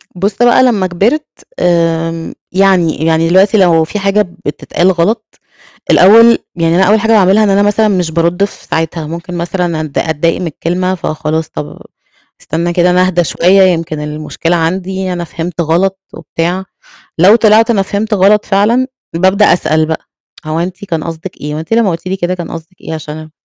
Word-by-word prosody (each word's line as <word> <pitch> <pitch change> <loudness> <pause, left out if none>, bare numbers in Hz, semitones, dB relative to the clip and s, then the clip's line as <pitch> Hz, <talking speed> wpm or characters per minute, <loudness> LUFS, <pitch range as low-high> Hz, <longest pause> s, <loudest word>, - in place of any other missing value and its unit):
بُصّ 195 +3 -2
بقى 240 +1 +5
لمّا 210 -7 +1
كبرت 220 - 0 0.3
آمم، 165 -1 0 0.2
يعني 180 -4 +2
يعني 165 0 +2
دلوقتي 195 +4 +4
لو 170 -4 +4
في 210 +6 -4
حاجة 200 +1 +1 0.2
بتتقال 175 +5 0
غلط، 180 +6 -2 0.5
الأول 230 +5 +6 0.2
يعني 165 -1 +1
أنا 190 - +4
أول 210 +3 +3
حاجة 225 +2 0
باعملها 205 0 +4
إن 210 - +2
أنا 195 +1 +3
مثلًا 210 +1 +2
مش 180 -5 0
بارُد 170 +3 0
في 200 - -6
ساعتها 160 -1 -2
ممكن 170 +2 -7
مثلًا 170 -1 -2
أتض 155 -3 -6
أتضايق 160 +2 -1
من 180 - -3
الكلمة 180 +4 -2
فخلاص 160 -2 -3
طب 145 - -8 0.6
أستنى 170 +2 -2
كده 175 +1 +2
أنا 180 +1 +3
أهدا 175 -1 +1
شوية 180 +6 +3
يمكن 165 -4 0
المشكلة 150 +3 -3
عندي 185 +3 -2
أنا 175 -1 -4
فهمت 170 +1 -5
غلط 180 +4 0
وبتاع، 170 +4 -3 0.5
لو 190 +7 +6
طلعت 220 0 +4
أنا 205 -4 +2
فهمت 205 +3 -2
غلط 205 +2 +3
فعلًا 215 +6 +2 0.3
بأبدأ 190 +4 +3
أسأل 155 -2 +1
بقى: 160 0 -3 0.5
هو 155 +1 -2
أنتِ 180 +3 -5
كان 165 -5 -3
قصدِك 165 +2 -8
إيه، 150 +1 -5
هو - - -4
أنتِ 160 +7 -9
لمّا 225 -4 +3
قلتِ 165 +1 -5
لي 190 +1 -2
كده 185 -1 -2
كان 175 -2 -7
قصدِك 165 +2 -10
إيه 160 - -6
عشان 155 0 -8
180 Hz, 180 wpm, -12 LUFS, 165-195 Hz, 0.6 s, الأول